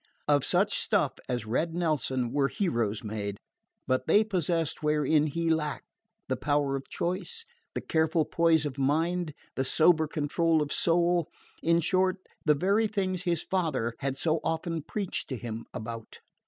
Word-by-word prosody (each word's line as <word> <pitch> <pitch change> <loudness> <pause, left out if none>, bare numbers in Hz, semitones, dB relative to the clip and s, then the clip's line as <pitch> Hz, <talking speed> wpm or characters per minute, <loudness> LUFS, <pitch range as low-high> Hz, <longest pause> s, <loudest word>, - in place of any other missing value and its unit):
Of 145 -2 +3
such - - +2
stuff - - +2 0.2
as 120 -3 -2
Red 160 +9 -1
Nelson 130 -8 0
were 140 0 +2
heroes 115 - -1
made; 105 -2 -4 0.5
but 130 0 0
they 210 - +5
possessed 170 -6 -1
wherein 150 0 +2
he 165 +2 0
lacked 150 -2 -2 0.3
the - - 0
power 145 -2 0
of 135 - -6
choice, 200 - -3 0.3
the - - -2
careful 160 0 +1
poise 165 -2 +3
of 140 -2 -4
mind, 160 +3 0 0.2
the 130 - 0
sober 160 +3 +4
control 155 +1 +1
of 145 - -4
soul: 175 0 +2 0.3
in 170 +1 +3
short, 185 +3 +2 0.3
the 150 -2 +4
very 200 +8 +2
things 190 -3 -2
his 170 -2 0
father 155 -11 -1
had 135 0 -2
so 160 +2 +1
often 165 0 -2
"preached" 195 +5 -3
to 130 - -3
him 115 0 -6
about. 115 0 -7
155 Hz, 155 wpm, -28 LUFS, 135-170 Hz, 0.5 s, they